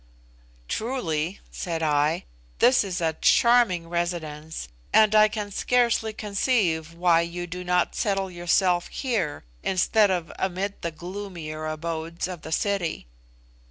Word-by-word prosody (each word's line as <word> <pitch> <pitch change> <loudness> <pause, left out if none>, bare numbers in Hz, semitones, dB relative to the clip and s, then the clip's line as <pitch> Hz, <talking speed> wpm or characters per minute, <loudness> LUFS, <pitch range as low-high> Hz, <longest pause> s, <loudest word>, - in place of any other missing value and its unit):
"Truly," 185 -8 -2
said 165 -3 -3
I, 150 +2 +1 0.3
"this 250 0 +5
is 190 -2 -3
a 160 -1 +1
charming 235 -8 +4
residence, 160 -3 -3 0.2
and 215 -1 +5
I 215 0 +7
can 210 -1 -5
scarcely 235 0 +2
conceive 200 -6 0
why 170 -1 +4
you 170 +1 -4
do 180 +1 -6
not 180 0 +1
settle 195 -2 -1
yourself 175 +1 +2
here 215 - -2 0.2
instead 200 +3 +3
of 175 -3 -1
amid 190 +2 -2
the 170 - -2
gloomier 170 -3 -6
abodes 165 +2 -3
of 180 -3 -7
the 160 - -8
city." 195 - -1
180 Hz, 125 wpm, -25 LUFS, 165-205 Hz, 0.3 s, I